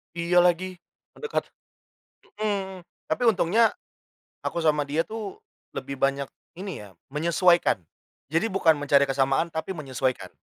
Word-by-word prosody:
Iya 175 +1 +3
lagi, 180 +1 +2 0.4
mendekat 455 -1 -2 1.0
mhm. 190 -4 -2 0.2
Tapi 160 +10 0
untungnya 220 +2 +4 0.7
aku 170 - -1
sama 150 -2 +2
dia 150 +3 +1
tuh 215 -3 -6 0.4
lebih 140 - -4
banyak 140 0 +1 0.3
ini 190 - -5
ya - - -13 0.2
menyesuaikan. 170 - +3 0.5
Jadi 165 +7 +1
bukan 180 -5 +4
mencari 145 -1 +4
kesamaan, 135 +4 +2
tapi 160 +3 -4
menyesuaikan. 130 -4 -2
170 Hz, 120 wpm, -26 LUFS, 145-190 Hz, 1.0 s, untungnya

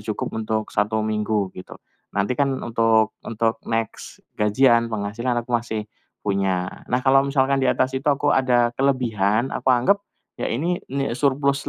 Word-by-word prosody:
cukup 105 0 -4
untuk 110 -1 -3
1 110 +1 0
minggu, 105 -2 -1
gitu. 90 - -10 0.4
Nanti 100 +5 +1
kan 140 -2 +1
untuk 115 -1 +2
untuk 115 0 -1
next 115 -1 -4 0.2
gajian, 115 +2 +4
penghasilan 115 +3 -2
aku - - -14
masih 115 -2 -1 0.4
punya. 95 -3 0 0.2
Nah, 125 +2 0
kalau 135 0 +6
misalkan 135 0 +1
di 130 - +2
atas 130 +1 +1
itu 135 +2 -2
aku 145 +1 +2
ada 120 -2 +3
kelebihan, 120 -4 +1
aku - - -2
anggap 130 +11 +4 0.4
ya - - -1
ini 170 +9 -1
ni 135 -2 -1
surplus 140 +1 0
115 Hz, 155 wpm, -22 LUFS, 110-135 Hz, 0.4 s, kalau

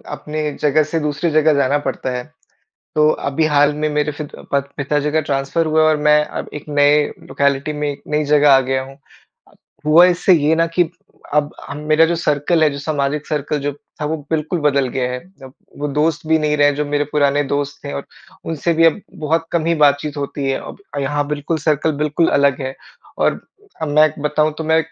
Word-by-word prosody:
अपनी 150 0 -4
जगह 150 +1 +3
से 165 - +2
दूसरी 150 +4 -1
जगह 155 0 +4
जाना 140 0 +2
पड़ता 130 0 -4
है। 125 - -5 0.7
तो 150 0 +4 0.2
अभी 155 +3 0
हाल 145 -1 +3
में 155 +1 -1
मेरे 150 0 0
फित 145 0 -8 0.2
पत 140 -1 0
पिताजी 145 +1 -1
का 160 - +3
ट्रांसफर 140 +3 -1
हुआ 155 0 +2
है 155 - +5
और 155 - +3
मैं 150 0 +5
अब - - -6
एक 150 - -7
नए 145 0 +4 0.2
लोकेलिटी 140 +1 0
में, 150 0 -2
एक 140 - -9
नई 150 0 0
जगह 145 0 +4
आ 135 - +7
गया 130 0 -1
हूँ। 135 +1 -12 0.9
हुआ 160 +3 +7
इससे 180 +1 +3
ये 155 0 +3
ना 165 0 +2
कि, 165 0 0 0.4
अब 150 0 +1 0.2
हम 140 +1 -6
मेरा 155 +1 +5
जो 170 +1 -1
सर्किल 160 +1 +1
है, - - +5
जो 140 - -6
सामाजिक 145 0 -2
सर्किल 150 0 -2
जो 145 +1 -2 0.3
था, - - -2
वो 155 +2 -1
बिल्कुल 160 +2 -1
बदल 140 -3 +2
गया 125 0 -2
है। 125 - -3 0.3
अब 130 - -12 0.3
वो 145 +1 -2
दोस्त 150 +2 0
भी 160 0 +4
नहीं 150 -1 0
रहे 145 0 +4
हैं, 145 - +1
जो 150 - -1
मेरे 145 0 0
पुराने 145 -1 +2
दोस्त 145 0 -2
थे - - -5
और 70 - -5 0.4
उनसे 165 +1 -1
भी 165 +1 +3
अब 165 +6 +2 0.2
बहुत 165 +2 0
कम 165 -2 0
ही 170 - +2
बातचीत 145 +1 +1
होती 140 0 -4
है। 135 - -1
अब - - -10 0.2
यहाँ 145 +1 -1
बिल्कुल 150 +2 -2
सर्किल 155 0 +1
बिल्कुल 150 +2 +1
अलग 140 -1 +2
है 130 0 -4 0.4
और - - +1 0.4
अब 155 - -1
मैं 150 +1 +5
एक 155 0 -6
बताऊँ, 150 +1 +1
तो 160 - -4
मैं 160 +1 +3
150 Hz, 215 wpm, -18 LUFS, 140-155 Hz, 0.9 s, आ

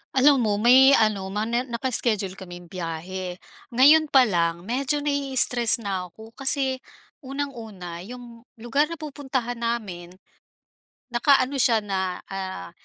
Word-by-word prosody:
Alam 275 +1 +5
mo, 215 -4 +1
may 255 +6 +6
ano, 215 -5 +1
ma 210 +2 -2
na 235 +3 -1
naka-iskediul 230 -6 -2
kaming 175 -2 -11
biyahe. 180 +1 -5 0.4
Ngayon 305 +5 +6
pa 270 -3 +5
lang 170 -5 0
medyo 270 +7 -1
nai-stress 260 -5 +1
na 190 -3 -3
ako 220 +5 -15
kasi 265 0 -1 0.4
unang-una, 230 - -6
’yong 240 -1 -11
lugar 240 +6 0
na 335 - -6
pupuntahan 265 -6 -4
namin, 195 -7 -4 1.0
nakaano 260 +2 +3
siya 235 -3 +4
na, 190 -2 -3
ah, 190 - -6
235 Hz, 125 wpm, -24 LUFS, 190-265 Hz, 1.0 s, may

